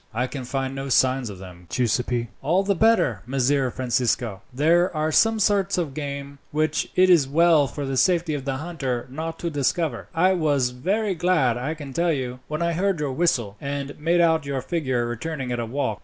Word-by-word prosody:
"I 125 +2 +1
can 130 0 -6
find 135 +1 -2
no 135 0 -5
signs 130 -1 +2
of 100 - -8
them, 90 -2 -12
Giuseppi." 120 0 0
"All 175 +8 +2
the 200 0 +1
better, 220 - +2
Messer 135 0 +1
Francisco. 120 -4 -1
There 165 +7 +3
are 155 +1 0
some 225 +7 +4
sorts 195 -2 +2
of 165 -6 -2
game, 140 -1 -6
which 155 0 0
it 185 0 +5
is 170 -7 +5
well 160 0 +4
for 145 +1 -5
the 135 0 -2
safety 170 +2 +2
of 145 -3 -3
the 135 -1 -2
hunter 135 -6 -3
not 160 +3 -5
to 170 - -3
discover. 145 -1 -1
I 185 +3 +4
was 145 -7 +1
very 195 - -1
glad, 160 -8 +2
I 135 +6 -3
can 145 -3 -9
tell 170 +4 +1
you, 125 -3 -4
when 155 +2 -2
I 170 0 0
heard 190 0 0
your 145 -2 -1
whistle, 125 -9 0
and 140 0 -4
made 170 +3 +2
out 160 -2 +3
your 135 -2 -2
figure 130 -8 -1
returning 130 +2 -4
at 120 - -2
a 115 - -3
walk. 115 -5 -2
140 Hz, 200 wpm, -24 LUFS, 130-170 Hz, -, it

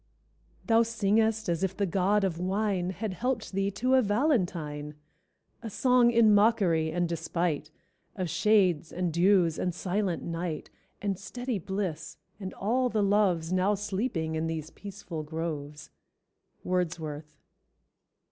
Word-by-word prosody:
_ - - -29
"Thou 230 -1 +4
singest 220 -1 +1
as 170 +1 0
if 190 0 -1
the 205 - +1
God 195 +3 +2
of 175 -4 -1
Wine 190 0 0
Had 190 +2 -4
helped 245 +3 -2
thee 195 +1 0
to 250 +6 0
a 260 - +6
valentine; 175 - 0 0.7
A 230 - -5
song 250 +2 +4
in 230 -2 +5
mockery 195 -7 +3
and 175 +1 0
despite 165 -2 -2 0.5
Of 185 -3 -2
shades 180 -3 +2
and 175 -2 -2
dews 175 -2 +3
and 180 -2 -1
silent 185 -1 -1
night, 165 -2 -4 0.3
And 195 -2 -1
steady 245 +1 -4
bliss 185 -3 -4 0.2
and 190 -2 -5
all 250 +5 +1
the 215 -3 +1
loves 190 -5 +2
Now 185 +3 +2
sleeping 195 -5 -2
in 160 +1 -1
these 160 -1 -4
peaceful 195 -5 -7
groves." 150 -2 -5 0.7
—_Wordsworth. 160 -4 -3
185 Hz, 140 wpm, -28 LUFS, 165-210 Hz, 0.7 s, a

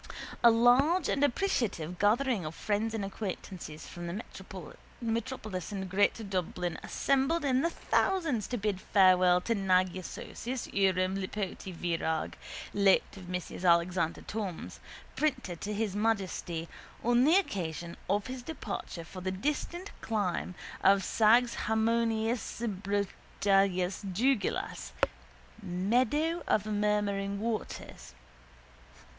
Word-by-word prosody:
A 235 - +10
large 255 +9 +5
and 280 - +1
appreciative 235 - 0
gathering 225 0 +2
of 155 +1 -5
friends 215 +1 -1
and 205 -3 -2
acquaintances 190 -5 -6
from 175 0 -7
the 195 +7 -4 0.8
metropolis 225 -5 -3
and 190 -2 -3
greater 205 +4 +2
Dublin 180 -3 -2
assembled 275 +4 +1
in 260 -1 +3
their 335 - +2
thousands 330 - +1
to 245 - -2
bid 205 -3 -1
farewell 185 -2 +5
to 230 - 0
Nagyaságos 190 +5 -1
uram 190 -1 +2
Lipóti 195 0 -4
Virag, 165 -2 -1 0.4
late 200 -1 +3
of 185 -2 -10
Messrs 180 0 -4
Alexander 170 -1 +3
Thom's, 200 -6 -5 0.4
printers 230 - -1
to 210 - -4
His 210 -2 -1
Majesty, 190 -6 -1 0.4
on 240 +1 +4
the 310 +5 +5
occasion 170 - -1
of 205 0 +1
his 255 0 -5
departure 235 - -5
for 185 +2 -9
the 185 - -1
distant 300 - -3
clime 200 -4 -1 0.3
of 195 0 +5
Százharminczbrojúgulyás 220 -2 +1 1.1
Dugulás 230 +1 0 0.7
(Meadow 250 - +1
of 210 - +2
Murmuring 205 -1 0
Waters). 215 - -5
205 Hz, 110 wpm, -31 LUFS, 185-235 Hz, 1.1 s, A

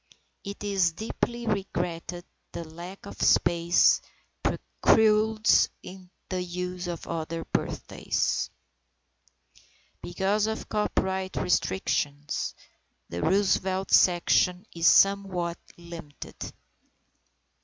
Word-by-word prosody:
It 200 +1 -7
is 195 -4 +2
deeply 235 +4 -3
regretted 175 -4 -3 0.3
that 170 - -5
lack 175 +5 -10
of 200 - -9
space 170 0 +4 0.4
precludes 215 0 +3 0.6
the 185 -1 -2
use 180 0 -4
of 175 -1 -5
other 165 0 -4
birthdays. - - -1 1.5
Because 195 +4 0
of 220 0 -4
copyright 190 -3 -1
restrictions, 145 -5 -1 0.5
the 85 - -4
Roosevelt 190 0 +1
section 180 +1 +4
is 170 0 +2
somewhat 190 -4 +3 0.2
limited. 170 -4 -10
180 Hz, 80 wpm, -27 LUFS, 170-200 Hz, 1.5 s, space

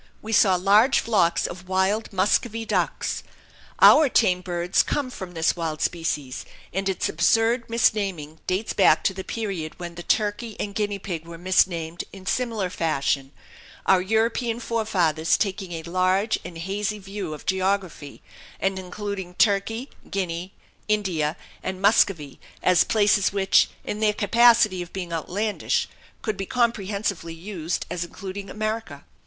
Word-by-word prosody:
We 220 +1 -6
saw 195 -3 +5
large 205 +8 +4
flocks 205 -7 +2
of 180 +1 -7
wild 190 +4 0
muscovy 215 +4 +1
ducks. - - -1 0.6
Our 305 -2 +8
tame 180 -7 +3
birds 175 0 +1
come 270 -3 -2
from 185 -6 -8
this 165 0 +2
wild 160 -3 -3
species 150 -6 -2 0.3
and 195 0 -1
its 190 - -1
absurd 225 +8 +2
misnaming 195 -9 0
dates 190 +4 -1
back 195 - +4
to 195 - +1
the 190 0 -6
period 195 -9 -4
when 175 -1 -6
the 175 - -8
turkey 210 +4 -1
and 200 - -3
guinea 205 -1 -1
pig 170 -4 -6
were 170 0 -8
misnamed 170 -2 +1
in 190 -1 -12
similar 220 -4 -1
fashion 140 -4 -1 0.5
our 190 -1 +5
European 225 +3 0
forefathers 180 -9 +1
taking 190 -3 -2
a 165 -1 -5
large 185 +5 +1
and 170 - -8
hazy 200 +4 -2
view 195 -5 -6
of 150 - -13
geography, 190 -6 -2 0.4
and 195 0 0
including 190 -1 -6
Turkey, 215 +5 +1 0.2
Guinea, 180 -1 -3 0.4
India, 185 -8 0 0.2
and 185 - -4
Muscovy 190 -8 +2 0.2
as 180 -2 +5
places 205 -2 +3
which, 195 -1 +3
in 210 - -4
their 215 -1 +3
capacity 215 -2 +4
of 175 - -9
being 180 -3 -5
outlandish, 200 +6 -1 0.4
could 215 -3 -2
be 195 -1 -4
comprehensively 200 -7 -1
used 170 -1 -4
as 175 - -2
including 195 +3 -7
America. 215 +1 -4
195 Hz, 145 wpm, -24 LUFS, 175-215 Hz, 0.6 s, Our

